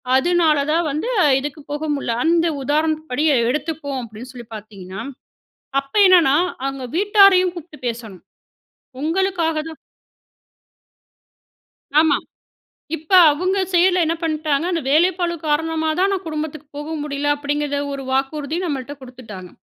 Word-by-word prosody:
அதனால 325 Hz, +1 st, +3 dB
தான் 335 Hz, +2 st, +2 dB
வந்து 310 Hz, -, -3 dB, 0.3 s
இதுக்கு 295 Hz, +3 st, -6 dB
போக 295 Hz, +1 st, -3 dB
முடியல. 260 Hz, -5 st, -2 dB
"அந்த 335 Hz, +1 st, +3 dB, 0.2 s
உதாரணப்படி 305 Hz, -1 st, -1 dB, 0.3 s
எடுத்துப்போம்." 285 Hz, 0 st, -3 dB
அப்படீன்னு 230 Hz, +2 st, -10 dB
சொல்லி 240 Hz, -2 st, -10 dB
பார்த்தீங்கன்னா, 200 Hz, -3 st, -9 dB, 0.8 s
அப்ப 275 Hz, 0 st, -22 dB
என்னன்னா 340 Hz, -7 st, +5 dB, 0.3 s
அவங்க 270 Hz, -1 st, -4 dB
வீட்டாரையும் 395 Hz, -2 st, +5 dB
கூப்பிட்டு 340 Hz, -3 st, -10 dB
பேசணும். 225 Hz, -6 st, -7 dB, 0.8 s
உங்களுக்காக 335 Hz, +1 st, 0 dB
தான் 320 Hz, -, -10 dB, 2.2 s
ஆமா, 310 Hz, -3 st, +3 dB, 0.8 s
இப்ப 315 Hz, +1 st, -16 dB, 0.2 s
அவங்க 365 Hz, +6 st, -1 dB
சைடில 360 Hz, 0 st, +4 dB
என்ன 325 Hz, -, 0 dB
பண்ணீட்டாங்க, 310 Hz, -2 st, 0 dB
"அந்த 335 Hz, -, 0 dB
வேலைப்பளு 345 Hz, +3 st, +2 dB
காரணமா 320 Hz, +1 st, 0 dB
தான், 385 Hz, +2 st, +3 dB
நான் 385 Hz, -1 st, -3 dB
குடும்பத்துக்கு 310 Hz, -1 st, -5 dB
போக 295 Hz, +1 st, -6 dB
முடியல." 290 Hz, -1 st, -3 dB
அப்படீங்கிற 290 Hz, 0 st, -2 dB, 0.2 s
1 275 Hz, -1 st, -5 dB
வாக்குறுதி 280 Hz, +3 st, -1 dB
நம்மள்ட்ட 285 Hz, -4 st, -4 dB
குடுத்துட்டாங்க. 225 Hz, -8 st, -11 dB
305 Hz, 120 wpm, -20 LUFS, 275-335 Hz, 2.2 s, என்னன்னா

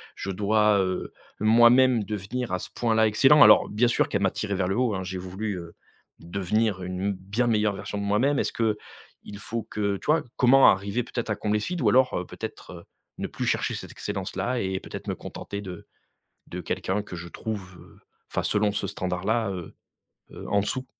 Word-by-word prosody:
je 95 Hz, -, -6 dB
dois, 105 Hz, +1 st, +2 dB
heu, 95 Hz, -1 st, -2 dB, 0.3 s
moi-même 120 Hz, +2 st, +5 dB
devenir 105 Hz, +4 st, -4 dB
à 90 Hz, -, 0 dB
ce -, -, -8 dB
point 115 Hz, -2 st, +1 dB
là 110 Hz, 0 st, +4 dB
excellent? 135 Hz, +7 st, +5 dB
Alors -, -, +7 dB
bien 110 Hz, +4 st, +2 dB
sûr 120 Hz, -, +1 dB
qu'elle 100 Hz, -, -1 dB
m'a 95 Hz, -, +3 dB
tiré 100 Hz, -2 st, -3 dB
vers 95 Hz, -1 st, 0 dB
le 95 Hz, -, -1 dB
haut, 125 Hz, -2 st, +1 dB
hein, 95 Hz, -1 st, -3 dB
j'ai 95 Hz, 0 st, -5 dB
voulu, 95 Hz, +3 st, -4 dB
heu, 85 Hz, -1 st, -9 dB, 0.5 s
devenir 95 Hz, +3 st, -1 dB
une 90 Hz, +2 st, -2 dB
bien 100 Hz, +6 st, -2 dB
meilleure 105 Hz, -3 st, +2 dB
version 105 Hz, -, -5 dB
de 100 Hz, -, -3 dB
moi-même, 115 Hz, +8 st, +2 dB
est-ce -, -, 0 dB
qu'il 105 Hz, -2 st, -5 dB
faut 115 Hz, +1 st, -4 dB
que, 100 Hz, -1 st, -2 dB
tu -, -, -14 dB
vois? 155 Hz, 0 st, +3 dB
Comment 130 Hz, +2 st, +6 dB
arriver 100 Hz, +5 st, 0 dB
peut-être 120 Hz, -1 st, -5 dB
à 110 Hz, -, +1 dB
combler 105 Hz, 0 st, 0 dB
ce -, -, -4 dB
vide? 180 Hz, -3 st, -3 dB
Ou 115 Hz, -, +2 dB
alors 130 Hz, +3 st, +3 dB
peut-être, -, -, -8 dB
heu, -, -, -10 dB, 0.4 s
ne -, -, -2 dB
plus -, -, -5 dB
chercher -, -, 0 dB
cette -, -, -8 dB
excellence -, -, -5 dB
là 125 Hz, 0 st, -1 dB
et 95 Hz, -3 st, -2 dB
peut-être -, -, -9 dB
me -, -, -1 dB
contenter 100 Hz, -, -7 dB
de 90 Hz, -3 st, -9 dB, 0.6 s
de -, -, -6 dB
quelqu'un 95 Hz, +3 st, -2 dB
que 100 Hz, -, -9 dB
je 85 Hz, 0 st, -7 dB
trouve, 95 Hz, -1 st, -6 dB
heu, -, -, -17 dB, 0.3 s
enfin -, -, -1 dB
selon 105 Hz, 0 st, +1 dB
ce 100 Hz, -1 st, -2 dB
standard 90 Hz, -1 st, -4 dB
là, 110 Hz, -1 st, +1 dB
heu, 90 Hz, -4 st, -7 dB, 0.6 s
heu, -, -, -9 dB
en 100 Hz, -, +3 dB
dessous. 130 Hz, +5 st, -3 dB
105 Hz, 210 wpm, -26 LUFS, 95-115 Hz, 0.6 s, Alors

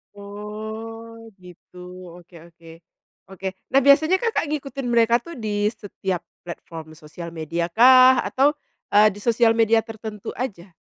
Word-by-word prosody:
Oh, 220 Hz, +3 st, -9 dB
gitu. 180 Hz, 0 st, -17 dB, 0.4 s
Oke 175 Hz, 0 st, -20 dB
oke. 170 Hz, 0 st, -20 dB, 0.6 s
Oke. 190 Hz, 0 st, -6 dB, 0.2 s
Nah 270 Hz, -, +5 dB
biasanya 305 Hz, +7 st, +4 dB
Kakak 460 Hz, +1 st, -1 dB
ngikutin 275 Hz, -3 st, -4 dB
mereka 235 Hz, 0 st, +3 dB
tuh 335 Hz, -7 st, -10 dB
di 210 Hz, -1 st, -1 dB
setiap 190 Hz, -4 st, -5 dB, 0.2 s
platform 165 Hz, -2 st, -9 dB
social 170 Hz, +2 st, -10 dB
media-kah? 195 Hz, -, +4 dB
Atau, 275 Hz, +3 st, +2 dB, 0.4 s
eee, 210 Hz, +1 st, +6 dB
di -, -, -10 dB
soial 230 Hz, -1 st, +3 dB
media 225 Hz, 0 st, +3 dB
tertentu 220 Hz, -2 st, -8 dB
aja? 195 Hz, -7 st, -6 dB
220 Hz, 125 wpm, -22 LUFS, 180-240 Hz, 0.6 s, eee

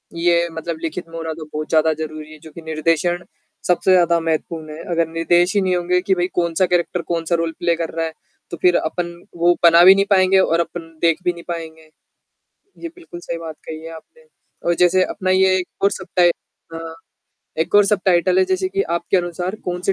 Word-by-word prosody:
ये 170 Hz, 0 st, +2 dB
मतलब 165 Hz, 0 st, -5 dB
लिखित 165 Hz, +1 st, -4 dB
में 165 Hz, -, -8 dB
होना 160 Hz, -1 st, -4 dB
तो 155 Hz, -1 st, -9 dB
बहुत 155 Hz, 0 st, -4 dB
ज़्यादा 160 Hz, 0 st, +3 dB
ज़रूरी 155 Hz, 0 st, -7 dB
है 155 Hz, -, -13 dB
जो 160 Hz, 0 st, -13 dB
कि 165 Hz, -, -11 dB
निर्देशन 165 Hz, +3 st, -1 dB, 0.4 s
सबसे 180 Hz, +1 st, +2 dB
ज़्यादा 170 Hz, -2 st, +4 dB
महत्वपूर्ण 160 Hz, -1 st, -3 dB
है, 160 Hz, -, -9 dB
अगर 170 Hz, -1 st, +1 dB
निर्देश 175 Hz, +3 st, +2 dB
ही 200 Hz, -, +3 dB
नहीं 185 Hz, -1 st, +1 dB
होंगे 180 Hz, +1 st, +1 dB
कि 190 Hz, +1 st, +1 dB
भई 175 Hz, 0 st, 0 dB
कौन-सा 170 Hz, +1 st, +1 dB
कैरेक्टर 175 Hz, 0 st, 0 dB
कौन-सा 170 Hz, 0 st, -1 dB
रोल 165 Hz, 0 st, -1 dB
प्ले 170 Hz, -1 st, +1 dB
कर 165 Hz, -1 st, -3 dB
रहा 165 Hz, 0 st, -1 dB
है, 160 Hz, -, -4 dB, 0.4 s
तो 170 Hz, -, -5 dB
फिर 180 Hz, -1 st, +4 dB
अपन 170 Hz, +2 st, -3 dB, 0.2 s
वो 175 Hz, +1 st, +4 dB
बना 170 Hz, 0 st, +7 dB
भी 190 Hz, +1 st, +9 dB
नहीं 195 Hz, 0 st, +2 dB
पाएँगे 190 Hz, -1 st, +4 dB
और 170 Hz, -3 st, +2 dB
अपन 170 Hz, 0 st, -3 dB, 0.2 s
देख 165 Hz, +1 st, +2 dB
भी 180 Hz, -, +2 dB
नहीं 170 Hz, -, -12 dB
पाएँगे। 160 Hz, -2 st, -7 dB, 0.9 s
ये 335 Hz, -, -4 dB
बिल्कुल 340 Hz, -, -11 dB
सही 170 Hz, -1 st, -5 dB
बात 165 Hz, -2 st, -8 dB
कही 155 Hz, 0 st, -7 dB
है 165 Hz, -, -8 dB
आपने, 475 Hz, -, -15 dB, 0.4 s
और 175 Hz, -, +3 dB
जैसे 180 Hz, +2 st, +3 dB
अपना 185 Hz, 0 st, -3 dB
ये 190 Hz, 0 st, +4 dB
एक 185 Hz, -, -3 dB, 0.2 s
और 200 Hz, -, +4 dB
सब-टाइ 175 Hz, -1 st, +1 dB, 0.4 s
अ, 165 Hz, 0 st, -7 dB, 0.7 s
एक 160 Hz, -, -1 dB
और 205 Hz, 0 st, +7 dB
सब-टाइटल 190 Hz, -, +2 dB
है, 375 Hz, -, +4 dB
जैसे 375 Hz, 0 st, -1 dB
कि 390 Hz, +1 st, -1 dB
आपके 170 Hz, +3 st, 0 dB
अनुसार 175 Hz, +2 st, -2 dB
कौन-से 180 Hz, +2 st, -1 dB
170 Hz, 210 wpm, -20 LUFS, 165-180 Hz, 0.9 s, भी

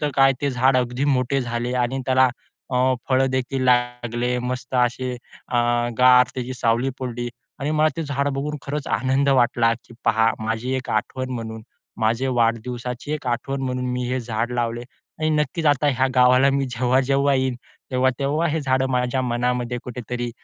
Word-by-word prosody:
तर 150 Hz, -1 st, 0 dB
काय 135 Hz, 0 st, +5 dB
ते 140 Hz, -, 0 dB
झाड 130 Hz, +1 st, +3 dB
अगदी 125 Hz, +1 st, 0 dB
मोठे 135 Hz, -1 st, +1 dB
झाले 120 Hz, 0 st, -3 dB
आणि 135 Hz, +2 st, -2 dB
त्याला 130 Hz, 0 st, +4 dB, 0.4 s
अ, 125 Hz, -, 0 dB, 0.3 s
फळं 130 Hz, 0 st, +3 dB
देखील 130 Hz, 0 st, -1 dB
लागले 125 Hz, 0 st, +1 dB
मस्त 125 Hz, +1 st, -4 dB
असे 125 Hz, +1 st, +1 dB, 0.4 s
अ, 125 Hz, -, -1 dB, 0.4 s
गार 125 Hz, 0 st, +7 dB
त्याची 130 Hz, 0 st, -4 dB
सावली 120 Hz, +2 st, +1 dB
पडली 120 Hz, -2 st, -4 dB, 0.3 s
आणि 145 Hz, +2 st, -1 dB
मला 155 Hz, +1 st, +4 dB
ते 165 Hz, -, -2 dB
झाड 140 Hz, -1 st, -1 dB
बघून 145 Hz, +2 st, -3 dB
खरंच 145 Hz, +1 st, -4 dB
आनंद 135 Hz, +2 st, +1 dB
वाटला 120 Hz, -3 st, +3 dB
की 120 Hz, -, -15 dB
"पहा 115 Hz, +1 st, +3 dB
माझी 110 Hz, +4 st, -2 dB
एक 130 Hz, -, -5 dB
आठवण 130 Hz, +4 st, -2 dB
म्हणून, 110 Hz, -1 st, -6 dB, 0.4 s
माझे 115 Hz, +4 st, +1 dB
वाढदिवसाची 120 Hz, +3 st, -1 dB
एक 150 Hz, -3 st, -4 dB
आठवण 125 Hz, +3 st, -2 dB
म्हणून 125 Hz, -1 st, -2 dB
मी 125 Hz, 0 st, -2 dB
हे 130 Hz, 0 st, -1 dB
झाड 115 Hz, +1 st, -2 dB
लावले 120 Hz, 0 st, -2 dB
आणि 155 Hz, +4 st, -5 dB
नक्कीच 150 Hz, +1 st, 0 dB
आता 145 Hz, 0 st, +3 dB
ह्या 130 Hz, -1 st, +2 dB
गावाला 125 Hz, +2 st, +5 dB
मी 135 Hz, 0 st, 0 dB
जेव्हा-जेव्हा 130 Hz, +3 st, +2 dB
येईन, 130 Hz, -1 st, 0 dB, 0.4 s
तेव्हा-तेव्हा 135 Hz, +5 st, +1 dB
हे 160 Hz, +1 st, -1 dB
झाडं 130 Hz, -1 st, +1 dB
माझ्या 125 Hz, +1 st, 0 dB
मनामध्ये 125 Hz, 0 st, -1 dB
कुठेतरी 120 Hz, 0 st, -4 dB
125 Hz, 165 wpm, -22 LUFS, 120-135 Hz, 0.4 s, गार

